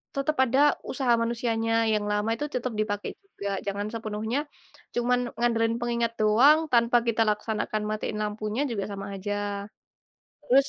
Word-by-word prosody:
tetap 275 +2 0
ada 260 +4 +2 0.3
usaha 255 -2 0
manusianya 230 -1 0 0.2
yang 210 -1 0
lama 210 +2 0
itu 295 +6 -1
tetap 250 -3 -3
dipakai 205 -1 -2
juga, 200 - -5
jangan 200 +1 -2
sepenuhnya 220 +2 -2 0.6
cuman 245 +1 +2 0.2
ngandelin 230 -1 +1
pengingat 235 -1 -1
doang 235 +9 +5
tanpa 235 0 +4
kita 230 -1 +1
laksanakan 215 +1 -1
matiin 215 0 -3
lampunya 215 +4 -2
juga 200 -3 -2
sama 195 0 -5
aja. 205 0 -3 0.7
Terus, 275 -1 +3
225 Hz, 140 wpm, -27 LUFS, 210-240 Hz, 0.7 s, doang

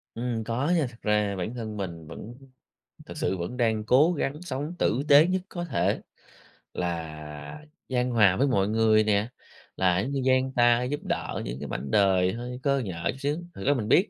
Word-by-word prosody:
Ừm, 115 -1 -2
có 120 +8 -1
nha. 160 -4 +2
Thật 120 - -15
ra 105 -1 +1
bản 95 +5 -4
thân 110 -3 -5
mình 85 -5 -6
vẫn 110 +8 -9 0.7
thực - - -9
sự 95 - -1
vẫn 90 +7 -5
đang 110 -3 +1
cố 135 +10 +5
gắng 150 -1 -3
sống 150 0 -4
tử 130 - +1
tế 145 +3 +8
nhất 185 +1 0
có 175 -1 -5
thể, 150 -9 0 0.7
là 80 - -5 0.2
chan 125 -1 0
hòa 105 -6 +5
với 140 - +3
mọi 100 -7 +2
người 110 0 +4
nè, 105 0 +1 0.5
là, 90 -1 +2
giống 125 +8 -2
như, 140 -1 -1
dang 130 0 +3
ta 120 0 +4
giúp 145 +4 -2
đỡ - - -3
những - - -5
cái - - -5
mảnh 70 - -5
đời 95 -3 +3
hơi 125 +2 -6
cơ 140 -1 +2
nhỡ 90 -8 -5
chút - - -11
xíu. 145 +2 0 0.2
Thực 95 - -7
ra 145 - +4
mình 115 -6 -2
biết, 185 - +4
115 Hz, 205 wpm, -27 LUFS, 95-135 Hz, 0.7 s, tế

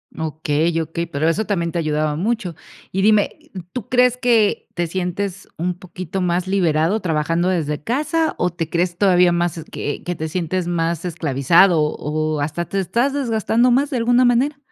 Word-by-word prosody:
Okey, 160 0 -1
okey, 165 +1 -3
pero 145 +3 -1
eso 190 +7 +1
también 170 -5 -1
te 175 - -1
ayudaba 155 -1 0
mucho. 195 0 -2 0.4
Y 190 - 0
dime, 210 0 +5 0.3
e 190 - -6
¿tú 250 -5 -6
crees 250 -1 +4
que 235 -4 +2
te 175 -1 -1
sientes 185 +2 -4
un 180 +2 -1
poquito 185 0 -6
más 180 0 0
liberado 180 +1 +1
trabajando 165 +1 0
desde 150 -5 -1
casa 305 - 0
o 180 - +1
te 165 -2 -4
crees 175 +1 -1
todavía 180 -3 +4
más, 175 0 0
eh, 160 - -7
que 145 - -4
que 180 - -2
te 160 0 -4
sientes 180 +2 -2
más 170 -1 -1
esclavizado 165 +1 +3
o 155 0 -1
hasta 155 +4 -2
te 195 - -1
estás 235 - +1
desgastando 235 -2 +1
más 270 +4 +2
de 265 - -2
alguna 245 +2 +3
manera? 250 +4 +2
175 Hz, 180 wpm, -20 LUFS, 160-210 Hz, 0.4 s, dime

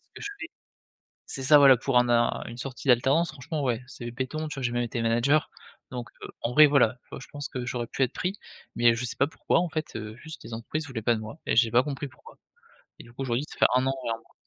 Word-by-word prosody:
que - - -10
je - - -3
fais 345 - -5 0.8
c'est 135 - -3
ça 145 +3 +7
voilà 135 -3 +8
pour 130 +1 +1
un 125 0 +4
a 120 0 +2
une 120 - -8
sortie 130 +1 -5
d'alternance 135 +7 +4
franchement, 145 +2 -5
ouais 125 -2 0
c'est 120 -2 -8
béton, 130 +6 -4
tu - - -6
vois? 135 - -5
J'ai 120 - 0
même 120 0 0
été 120 0 -3
manager 120 +6 +2 0.4
donc 120 -3 -6 0.3
en 115 - -1
vrai 155 +4 +8
voilà, 130 -5 +3
tu - - -34
vois, - - -7
je - - -11
pense 145 -1 -5
que 125 -1 -5
j'aurais 120 -2 -3
pu - - -5
être 125 - 0
pris 185 +1 -2 0.4
mais 120 0 +5
je 115 +2 -3
sais 115 - -5
pas 140 - +3
pourquoi 145 +2 0
en 175 - -1
fait, 155 -1 -4
heu, 110 0 -6
juste 160 +5 -10
les 115 - -9
entreprises 150 +8 -4
voulaient 130 -6 -5
pas 115 +2 +2
de 110 - -5
moi 110 +8 -9
et - - 0
j'ai 115 -1 +4
pas 120 +1 +5
compris 145 0 -4
pourquoi, - - -17 0.6
et - - -12
du 120 - -16
coup 135 - -6
aujourd'hui, 125 +1 -1
ça - - -11
fait - - +8
1 130 +1 +2
an 135 - +1
et - - -1
1 115 - -1
mois. - - -26
125 Hz, 275 wpm, -27 LUFS, 120-145 Hz, 0.8 s, voilà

